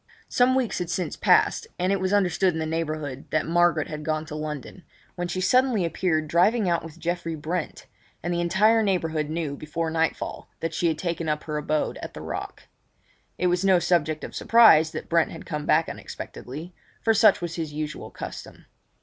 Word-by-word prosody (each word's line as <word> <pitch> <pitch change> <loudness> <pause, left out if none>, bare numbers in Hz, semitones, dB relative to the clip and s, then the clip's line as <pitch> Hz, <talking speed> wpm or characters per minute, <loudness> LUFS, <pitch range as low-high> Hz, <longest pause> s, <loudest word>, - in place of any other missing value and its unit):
Some 250 +1 +3
weeks 255 -4 0
had 175 -2 -3
since 180 0 -2
passed; 455 - +3
and 185 +2 0
it 195 - +1
was 190 0 -1
understood 190 -2 +2
in 160 - -3
the 160 - -1
neighbourhood 155 -4 -3
that 155 - 0
Margaret 170 -2 +2
had 150 -1 -6
gone 155 0 -1
to 155 -1 -7
London, 155 +3 -6 0.3
when 175 -1 -3
she 175 +1 -3
suddenly 250 -1 +3
appeared 160 -2 0
driving 195 +7 +3
out 170 -1 +1
with 165 0 -10
Geoffrey 170 0 -3
Brent, 160 +2 -4 0.4
and 175 +1 -1
the 175 - 0
entire 210 +6 +4
neighbourhood 165 -7 0
knew 155 -3 -2
before 160 +2 -3
nightfall 160 0 -2
that 165 0 -3
she 170 - +1
had 160 -2 0
taken 165 -1 -2
up 150 0 -1
her 150 - -4
abode 150 0 -1
at - - -8
the - - -7
Rock. - - -6 0.7
It - - -1
was 180 +1 +2
no 190 -2 +5
subject 165 -3 +1
of - - -7
surprise 220 -10 +6
that - - -7
Brent 165 -1 +2
had 165 - -9
come 150 -1 -4
back 160 +1 +3
unexpectedly, 155 +8 -8 0.3
for 225 - +4
such 215 -1 +5
was 175 -1 -4
his 160 -3 -3
usual 150 0 -5
custom. - - -9
165 Hz, 195 wpm, -25 LUFS, 155-185 Hz, 0.7 s, surprise